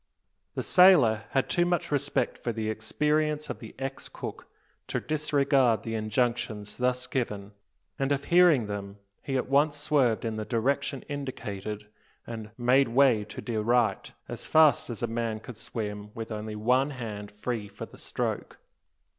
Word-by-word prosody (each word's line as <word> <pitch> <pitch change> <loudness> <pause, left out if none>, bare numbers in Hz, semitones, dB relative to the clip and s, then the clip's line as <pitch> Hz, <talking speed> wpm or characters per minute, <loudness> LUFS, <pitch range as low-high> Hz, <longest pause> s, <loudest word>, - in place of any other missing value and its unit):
The - - -2
sailor 140 - +6
had 135 - +1
too 175 - +2
much 175 -2 0
respect 145 -3 0
for 120 - -2
the 110 -1 -2
experience 150 +7 0
of - - -7
the 110 - -10
ex 135 0 -5
cook - - -7 0.4
to - - -1
disregard 140 -5 +2
the 115 - -4
injunctions 110 -1 -1
thus 125 0 0
given; 105 -6 -3 0.5
and 135 +1 0
of 140 0 +1
hearing 170 -6 +5
them, 100 -1 -6 0.2
he 135 -1 -2
at 125 - -1
once 145 +2 +3
swerved 140 -7 +2
in 110 -1 -2
the 110 - -2
direction 135 +4 -1
indicated, 105 -7 -5 0.4
and 110 -2 -7
"made 130 +3 +4
way 120 -3 +4
to 105 - -8
de 115 -3 -2
right" 120 +1 +1 0.2
as - - -6
fast 155 -6 +5
as 120 -1 -5
a - - +4
man 115 -1 -2
could 120 0 -10
swim 105 -2 -5
with 115 0 -6
only 110 0 -4
one 125 +6 +2
hand 110 -6 -6
free 105 +1 -4
for 100 +1 -8
the - - -15
stroke. - - -3
120 Hz, 165 wpm, -28 LUFS, 110-140 Hz, 0.5 s, sailor